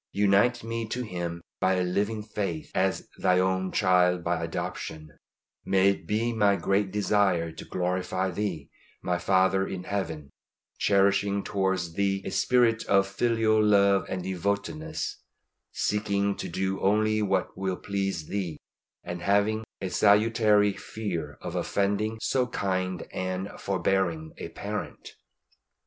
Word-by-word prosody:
Unite 100 +5 +3
me 115 0 -3
to 125 +3 -3
Him 85 -5 -5 0.2
by 95 0 +2
a 90 - +1
living 105 +4 -1
faith, 100 -7 -4
as - - 0
Thine 90 - +3
own 95 0 +1
child 90 -2 +3
by 85 0 -1
adoption; 80 -2 -5 0.5
may 95 0 +4
it 90 -4 -7
be 115 +4 0
my 105 -3 +3
great 100 0 +1
desire 100 -4 +1
to - - -10
glorify 90 +1 -1
Thee, 90 -6 -4 0.3
my 90 -1 0
Father 95 +1 +2
in 90 -1 -5
Heaven; 80 -8 -4 0.5
cherishing 100 0 +2
towards 95 -4 -1
Thee 95 +1 0
a - - -3
spirit 115 +3 +3
of 100 0 +4
filial 110 +1 +2
love 100 -2 +4
and 95 -1 -3
devotedness, 100 - -3 0.5
seeking 100 -1 0
to - - -5
do 95 +2 -2
only 110 +2 +2
what 95 -2 0
will 95 -1 -2
please 95 -5 -2
Thee, 90 -4 -3 0.5
and 90 0 -5
having 100 +4 +2 0.2
a 95 - -3
salutary 105 -1 +4
fear 85 -12 -5
of - - -5
offending 105 +2 0
so 125 -2 +1
kind 95 -5 -2
and 95 +1 -3
forbearing 90 -4 0
a - - -5
Parent. - - -6
95 Hz, 135 wpm, -27 LUFS, 90-105 Hz, 0.5 s, may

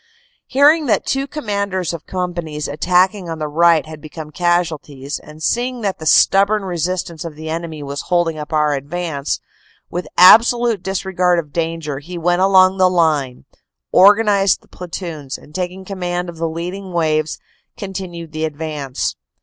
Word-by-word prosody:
Hearing 295 +3 +4
that 220 - +1
two 270 +1 -1
commanders 200 - -2
of 165 - -8
companies 175 -5 -3
attacking 180 +5 +1
on 165 - -4
the 155 -1 -3
right 165 +1 +3
had 155 -1 -10
become 155 0 -9
casualties, 155 -5 -1
and 155 +1 -13
seeing 245 +4 -1
that 200 -3 -2
the 160 - -5
stubborn 200 +5 +4
resistance 175 -1 -3
of 165 -3 -7
the 160 +1 -6
enemy 160 -2 -5
was 140 0 -5
holding 175 -2 +2
up 150 -2 -7
our 150 -1 +2
advance, 145 +1 -3 0.5
with 175 +1 -4
absolute 230 +3 +6
disregard 185 -2 0
of 150 -4 -4
danger, 165 -4 -2
he 175 +5 -8
went 175 +2 +1
along 190 0 +5
the 185 0 +5
line, 155 -8 0 0.5
organized 200 -1 +5
the - - -25
platoons, 165 -6 -6
and 150 - -18
taking 185 +1 -4
command 180 -2 -3
of 170 - -9
the 165 0 -1
leading 180 +3 -6
waves, 155 -2 0 0.4
con 195 -1 -6
tinued 175 -4 -6
the 155 0 -4
advance. 150 -3 -4
175 Hz, 160 wpm, -18 LUFS, 155-190 Hz, 0.5 s, absolute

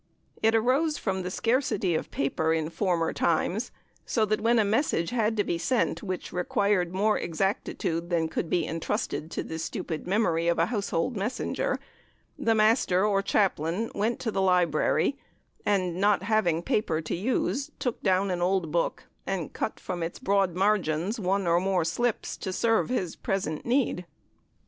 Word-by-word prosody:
It 225 +1 +4
arose 270 +7 +2
from 190 -2 -2
the 180 - -3
scarcity 230 -3 +1
of 160 - -2
paper 150 +3 0
in 160 0 -2
former 170 -4 0
times, 180 +7 0 0.3
so 220 -3 +1
that 215 +1 0
when 235 +2 +3
a 220 - +4
message 205 - +1
had 225 -2 +1
to 205 - +3
be 170 -3 -2
sent 230 +9 0
which 185 -3 -5
required 180 0 +1
more 210 +3 +2
exactitude 170 -1 -2
than 165 -2 +1
could 160 +1 -3
be 170 -3 +1
entrusted 160 0 -3
to - - -3
the 160 - -6
stupid 160 0 -4
memory 170 -5 +1
of 170 - +2
a 165 - +3
household 205 0 -1
messenger, 245 - -2 0.6
the 225 -1 +1
Master 215 -3 +3
or 200 -2 +2
Chaplain 195 0 0
went 220 +3 0
to 225 - -1
the 195 - 0
library, 180 - +2 0.5
and, 185 -4 +1
not 205 -2 +3
having 185 -6 +1
paper 165 -6 0
to 155 - -3
use, 260 - -1
took 250 -4 -3
down 190 +1 +2
an 175 -1 -2
old 180 -3 +1
book, 170 +1 0 0.2
and 185 -5 -3
cut - - -3
from 180 -2 -4
its 165 +1 -3
broad 195 -3 +1
margins 190 +1 +1
one 195 0 0
or 170 0 +3
more 185 -2 +1
slips 240 +7 -1
to 190 - -4
serve 225 +5 +1
his 190 -9 -1
present 160 -4 -3
need. 235 -8 +1
190 Hz, 170 wpm, -27 LUFS, 170-220 Hz, 0.6 s, It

